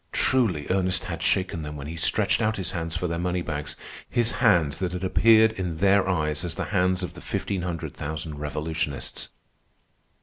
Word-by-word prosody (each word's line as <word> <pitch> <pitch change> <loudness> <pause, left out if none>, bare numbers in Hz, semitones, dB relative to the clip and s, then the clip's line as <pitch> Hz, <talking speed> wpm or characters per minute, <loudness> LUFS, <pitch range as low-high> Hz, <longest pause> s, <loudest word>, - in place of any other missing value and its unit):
Truly 105 - +1
Ernest 95 -1 +1
had - - -5
shaken 90 -3 +1
them 75 0 -6
when 70 -1 -7
he 80 +3 -6
stretched 80 - +2
out 110 0 +1
his 95 - -2
hands 80 -2 -3
for - - -2
their 85 -1 -2
moneybags, 85 -4 -2 0.3
his 120 -1 +3
hands 80 -3 +3
that 90 -1 -2
had 90 0 -4
appeared 110 +3 +5
in 90 -6 -4
their 100 +2 +3
eyes 75 -3 0
as 85 -2 -3
the - - -3
hands 95 -1 +2
of 90 - -4
the - - -11
fifteen 100 -3 -2
hundred 85 -3 -4
thousand 75 0 -5
revolutionists. 75 0 -3
90 Hz, 180 wpm, -25 LUFS, 80-95 Hz, 0.3 s, appeared